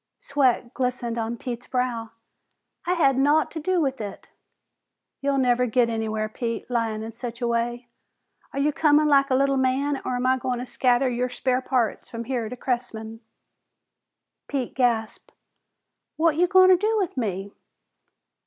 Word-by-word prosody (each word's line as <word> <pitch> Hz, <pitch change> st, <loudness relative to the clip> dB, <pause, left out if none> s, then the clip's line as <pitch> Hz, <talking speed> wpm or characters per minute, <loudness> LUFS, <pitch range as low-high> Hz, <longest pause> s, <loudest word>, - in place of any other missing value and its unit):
Sweat 260 Hz, -3 st, 0 dB
glistened 250 Hz, -2 st, -2 dB
on 230 Hz, +1 st, -3 dB
Pete's 240 Hz, 0 st, -6 dB
brow. 245 Hz, -3 st, -2 dB, 0.8 s
"I 360 Hz, -, +3 dB
had 275 Hz, -7 st, +3 dB
naught 295 Hz, +3 st, +3 dB
to 320 Hz, -, -5 dB
do 365 Hz, +3 st, 0 dB
with 270 Hz, -5 st, -1 dB
it!" 200 Hz, -2 st, -8 dB, 0.9 s
"You'll 280 Hz, 0 st, 0 dB
never 250 Hz, -1 st, +2 dB
git 235 Hz, 0 st, +2 dB
anywhere, 220 Hz, -1 st, -2 dB
Pete, 230 Hz, +1 st, -4 dB
lyin' 225 Hz, -2 st, -1 dB
in 225 Hz, +1 st, -7 dB
such 235 Hz, 0 st, -7 dB
a 240 Hz, -, -1 dB
way. 240 Hz, +1 st, -1 dB, 0.6 s
Are -, -, -8 dB
you 290 Hz, +2 st, +1 dB
comin' 300 Hz, 0 st, +4 dB
like 275 Hz, -1 st, +4 dB
a 260 Hz, -, +3 dB
little 275 Hz, +1 st, +2 dB
man, 265 Hz, +2 st, 0 dB
or 250 Hz, -, -2 dB
am 245 Hz, +1 st, -2 dB
I 260 Hz, 0 st, +3 dB
goin' 250 Hz, 0 st, -2 dB
to 245 Hz, -, -4 dB
scatter 250 Hz, +1 st, +2 dB
your 250 Hz, 0 st, -1 dB
spare 255 Hz, +1 st, 0 dB
parts 250 Hz, -4 st, -1 dB
from 230 Hz, 0 st, -5 dB
here 235 Hz, -3 st, -3 dB
to 250 Hz, -, -7 dB
Cressman?" 225 Hz, -3 st, -4 dB, 1.3 s
Pete 265 Hz, -4 st, -3 dB
gasped, 235 Hz, -4 st, -1 dB, 0.8 s
"What 320 Hz, 0 st, +2 dB
you 355 Hz, +3 st, +3 dB
goin' 370 Hz, 0 st, +6 dB
to 370 Hz, -, +7 dB
do 435 Hz, +4 st, +1 dB
with 385 Hz, -5 st, -1 dB
me?" 200 Hz, -5 st, -3 dB
250 Hz, 165 wpm, -24 LUFS, 235-275 Hz, 1.3 s, to